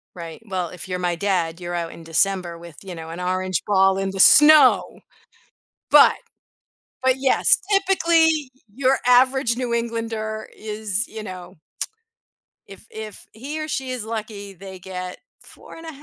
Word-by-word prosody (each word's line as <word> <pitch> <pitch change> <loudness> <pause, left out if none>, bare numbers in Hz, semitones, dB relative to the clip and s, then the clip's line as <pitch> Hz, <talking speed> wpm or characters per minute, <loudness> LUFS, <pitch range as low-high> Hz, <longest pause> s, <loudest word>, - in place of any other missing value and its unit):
Right. 170 0 -9
Well, 185 -3 -3
if 180 +1 -7
you're 180 -1 -3
my 175 -1 -1
dad, 175 -3 -1
you're 175 0 -5
out 170 -1 -3
in 165 - -12
December 175 +1 0
with, 170 -2 -13
you 185 -2 -8
know, 160 -1 -9
an 165 +2 -7
orange 185 -1 -2
ball 195 -1 +3
in 195 0 -2
the 195 - -7
snow. 300 +8 +6 0.9
But - - +7 0.9
but 260 0 +3
yes, 265 0 +3
typically, 330 -7 +2 0.2
your 265 0 +2
average 255 0 +4
New 245 -1 -3
Englander 225 -2 -3
is, 215 0 -3
you 220 -1 -8
know 185 -3 -9 1.1
If, 195 +2 -14
if 220 -2 -9
he 280 +8 -7
or 310 - -4
she 265 -4 -3
is 250 -3 -4
lucky, 215 -3 -6
they 190 0 -11
get 180 0 -7 0.2
4 - - -14
and 330 - -11
a - - -6
205 Hz, 155 wpm, -22 LUFS, 180-250 Hz, 1.1 s, But